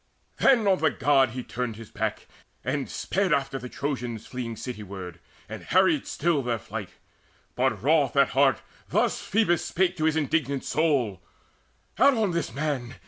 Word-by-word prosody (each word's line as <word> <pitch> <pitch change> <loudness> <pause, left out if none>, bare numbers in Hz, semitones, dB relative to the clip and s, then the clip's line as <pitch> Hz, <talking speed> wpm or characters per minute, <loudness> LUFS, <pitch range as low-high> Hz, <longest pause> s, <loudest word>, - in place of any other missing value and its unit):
Then 235 -6 +4
on 190 -2 +4
the 160 - +3
God 135 -3 +3
he 125 +2 -6
turned 120 -2 -4
his 110 0 -11
back, - - -3 0.4
and 135 +2 -2
sped 195 -1 -1
After 135 -1 0
the 125 0 -8
Trojans 125 -6 -4
fleeing 120 -3 -5
cityward, 100 -7 -7 0.3
And - - -7
harried - - +2
still 165 -4 +1
their 120 -2 -1
flight; - - -7 0.6
but 125 -5 0
wroth 145 -2 +3
at 140 -1 +5
heart 135 0 +3 0.3
Thus - - +1
Phoebus 195 -5 +1
spake 185 0 0
to 155 - 0
his 160 -1 +2
indignant 140 -3 0
soul: 135 - 0 0.8
"Out 275 +2 +6
on 215 -5 +1
this 170 -8 -2
man! 135 -2 -3
135 Hz, 160 wpm, -26 LUFS, 120-160 Hz, 0.8 s, Out